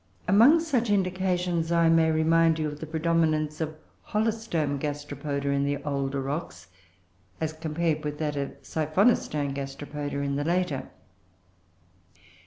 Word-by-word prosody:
Among 235 - +7
such 265 -9 0
indications 180 -3 0
I 170 -1 +4
may 165 0 +4
remind 160 +1 +3
you 155 -1 -1
of 150 0 -6
the 160 - -6
predominance 155 -1 0
of 155 0 -3 0.3
Holostome 210 -10 -1
Gasteropoda 145 -1 -3
in 140 0 +1
the 140 0 0
older 140 -1 -2
rocks 90 - -5 0.7
as 160 -1 -2
compared 155 0 -1
with 150 0 -3
that 150 -1 -2
of 140 -1 -4
Siphonostone 155 - +1
Gasteropoda 140 +1 -5
in 140 0 -1
the 145 - -1
later. 170 -4 -1
155 Hz, 130 wpm, -27 LUFS, 145-170 Hz, 0.7 s, Among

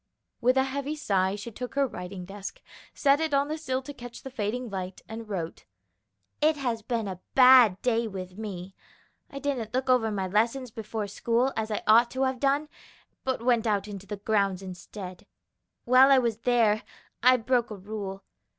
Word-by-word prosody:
With 255 +2 +3
a 265 - +5
heavy 280 +2 -3
sigh 195 -9 +1
she 210 +3 -7
took 250 +4 -7
her 280 0 +3
writing 180 -5 -7
desk, 200 +1 -8 0.3
set 280 0 +3
it 320 -3 0
on 280 +1 +2
the 310 - -2
sill 260 -4 -2
to 290 - -8
catch 245 -3 -10
the 265 - -7
fading 240 +2 -2
light, 190 -3 -5
and 220 0 -8
wrote: 170 -5 -5 0.8
"It 305 +1 +3
has 240 -5 -2
been 225 -1 -2
a 185 -2 -5 0.2
bad 250 -7 +7
day 235 -2 +1
with 185 -3 -7
me. 195 -3 -6 0.6
I 275 - -9
didn't 255 -6 -3
look 255 0 +1
over 235 -3 +3
my 195 -3 -2
lessons 230 +6 0
before 220 -1 -4
school, 235 +5 0
as 220 0 -2
I 210 - -2
ought 230 +2 +6
to 260 +1 0
have 260 -1 0
done, 280 +3 +1 0.6
but 260 -3 -2
went 240 -2 +3
out 205 -1 0
in 205 -2 -6
the 200 +2 -7
grounds 200 -2 0
instead. 185 0 -9 0.6
While 255 +2 +7
I 270 - +7
was 235 -4 +1
there, 230 -3 +2 0.4
I 255 +1 +6
broke 245 0 +1
a 215 - -6
rule. 195 -1 -6
230 Hz, 185 wpm, -27 LUFS, 200-260 Hz, 0.8 s, bad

